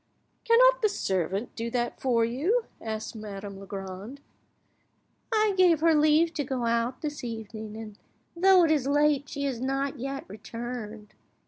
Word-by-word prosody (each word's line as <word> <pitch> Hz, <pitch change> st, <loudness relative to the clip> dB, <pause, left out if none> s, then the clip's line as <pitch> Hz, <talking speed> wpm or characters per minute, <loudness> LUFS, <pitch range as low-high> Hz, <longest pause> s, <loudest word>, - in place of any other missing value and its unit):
"Cannot -, -, +5 dB
your 430 Hz, -, +3 dB
servant 195 Hz, -, -2 dB
do 230 Hz, 0 st, -3 dB
that 240 Hz, 0 st, -2 dB
for 235 Hz, -3 st, +2 dB
you?" 335 Hz, -, 0 dB, 0.2 s
asked 220 Hz, 0 st, -5 dB
Madame 200 Hz, -2 st, -7 dB
Legrand. 195 Hz, +5 st, -7 dB, 1.1 s
"I 430 Hz, -2 st, +3 dB
gave 355 Hz, -4 st, +4 dB
her 330 Hz, 0 st, +5 dB
leave 310 Hz, +2 st, +4 dB
to 295 Hz, -, -1 dB
go 255 Hz, -3 st, -2 dB
out 235 Hz, +2 st, 0 dB
this 295 Hz, -1 st, -4 dB
evening, 220 Hz, -2 st, -6 dB
and 215 Hz, -2 st, -9 dB, 0.4 s
though 370 Hz, +1 st, +6 dB
it 320 Hz, -, +3 dB
is 285 Hz, -4 st, +1 dB
late 290 Hz, 0 st, +2 dB
she 280 Hz, -, -4 dB
has 260 Hz, -4 st, -2 dB
not 270 Hz, +1 st, -1 dB
yet 275 Hz, +2 st, -4 dB
returned. 220 Hz, 0 st, -7 dB
255 Hz, 150 wpm, -27 LUFS, 220-305 Hz, 1.1 s, though